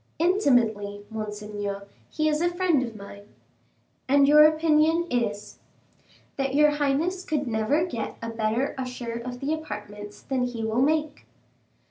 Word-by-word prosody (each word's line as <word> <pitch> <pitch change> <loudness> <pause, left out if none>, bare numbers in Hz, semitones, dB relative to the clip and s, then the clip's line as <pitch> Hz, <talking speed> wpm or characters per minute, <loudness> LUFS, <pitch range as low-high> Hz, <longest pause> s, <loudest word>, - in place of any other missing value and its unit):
"Intimately, 230 - +1
monseigneur. 210 -2 -5 0.2
He 310 0 -1
is 305 0 +1
a 345 - +2
friend 350 -5 +1
of 235 -3 -5
mine." 200 0 -12 0.7
"And 280 0 +5
your 300 +1 +8
opinion 315 +1 +3
is?" 210 -4 -2 0.8
"That 270 0 -1
your 300 0 +5
highness 295 +6 0
could 300 -4 -1
never 235 +8 +1
get 235 -11 -5
a 230 0 -5
better 225 +4 -1
usher 250 -2 -5
of 245 0 -7
the 285 +3 -1
apartments 210 -8 -7
than 260 -2 -1
he 240 -2 -5
will 220 +3 0
make." 300 +1 0
255 Hz, 140 wpm, -25 LUFS, 215-305 Hz, 0.8 s, your